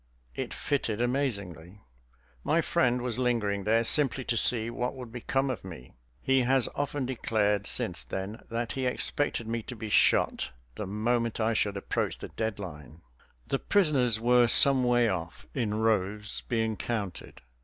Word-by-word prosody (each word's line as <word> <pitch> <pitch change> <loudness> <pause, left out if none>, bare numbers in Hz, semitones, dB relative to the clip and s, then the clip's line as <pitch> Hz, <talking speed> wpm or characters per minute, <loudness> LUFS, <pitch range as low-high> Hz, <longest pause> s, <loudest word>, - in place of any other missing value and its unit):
It - - -5
fitted 120 -7 -2
amazingly. 100 - -3 0.6
My - - +2
friend 125 -1 +1
was 125 -1 -2
lingering 105 -6 0
there, 115 +2 +3
simply 135 +1 +4
to 120 - -2
see 115 0 +3
what 125 +2 -3
would 125 -3 -9
become 135 +3 -1
of 125 - -6
me. 80 -10 -10 0.3
He 135 0 +3
has 130 0 +2
often 145 -1 -2
declared 105 -5 0
since 85 -6 -1
then 95 - -6
that 115 0 -3
he 130 -1 -2
expected 125 -2 -1
me 115 0 -2
to 125 - -8
be 110 -1 -6
shot - - +3 0.2
the 105 - -6
moment 115 +3 -1
I 110 +1 +1
should 100 -2 0
approach 100 - -2
the - - -8
dead 110 -2 -3
line. 80 -4 -10 0.4
The 135 - -1
prisoners 140 - +2
were 120 +1 +4
some 135 +2 +6
way 120 -1 +3
off, 85 -4 -4
in 110 -6 -1
rows, 105 -1 0
being 110 -2 0
counted. 105 -4 -5
115 Hz, 160 wpm, -28 LUFS, 105-125 Hz, 0.6 s, some